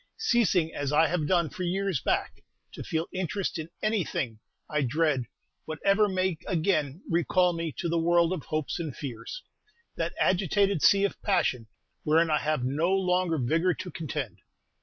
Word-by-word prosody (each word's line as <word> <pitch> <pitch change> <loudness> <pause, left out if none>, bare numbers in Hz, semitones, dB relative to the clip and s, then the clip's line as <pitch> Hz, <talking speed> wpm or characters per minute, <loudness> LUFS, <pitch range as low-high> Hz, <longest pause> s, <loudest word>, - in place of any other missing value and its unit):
Ceasing 220 - +2
as 145 -1 -2
I 155 +2 +5
have 170 -4 -1
done 170 -3 +2
for - - -8
years 185 -3 -1
back - - -1 0.3
to - - -8
feel 160 0 -1
interest 185 0 -2
in 160 +1 -6
anything, 170 - -1 0.3
I 150 -1 0
dread 145 -1 +1 0.4
whatever 195 +7 +2
may 185 -3 0
again 160 -4 0
recall 175 +1 +2
me 165 -1 -3
to 175 - -2
the 170 0 +1
world 170 +1 +3
of 175 - -5
hopes 155 +2 -2
and 155 -6 -4
fears, 140 - -6 0.5
that - - -2
agitated 195 -1 +2
sea 200 -1 +5
of 200 - -1
passion 155 - +1 0.3
wherein 160 +1 +3
I 150 - +3
have 150 -4 -1
no 145 +7 0
longer 180 -3 +1
vigor 165 +7 +1
to 185 -2 -7
contend. 150 - -5
170 Hz, 160 wpm, -28 LUFS, 150-185 Hz, 0.5 s, I